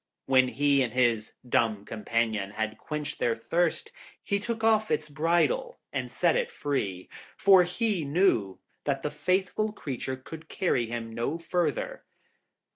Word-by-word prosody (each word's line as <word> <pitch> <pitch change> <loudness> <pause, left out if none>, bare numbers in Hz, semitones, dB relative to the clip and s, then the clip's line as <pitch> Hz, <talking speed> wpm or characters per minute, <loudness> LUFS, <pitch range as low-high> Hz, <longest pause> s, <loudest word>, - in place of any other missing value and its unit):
When 130 -1 +5
he 140 +3 +2
and 120 -3 -1
his 120 -4 +1
dumb 110 -4 +1
companion 110 -2 -1
had 110 +1 -3
quenched 150 -1 -5
their 115 -1 +1
thirst, 165 +8 -1 0.3
he 200 - 0
took 225 +1 -4
off 220 -1 +3
its 150 - 0
bridle 175 - +1 0.2
and - - -2
set - - +2
it - - 0
free, 100 -11 -2 0.3
for 195 -2 +7
he 180 0 0
knew 140 - +2 0.3
that 140 -2 -1
the 150 - -1
faithful 185 +7 0
creature 130 - -4
could 160 +5 -11
carry 130 - 0
him 115 -1 -5
no 120 +8 -2
further. 185 - -2
145 Hz, 145 wpm, -28 LUFS, 115-185 Hz, 0.3 s, for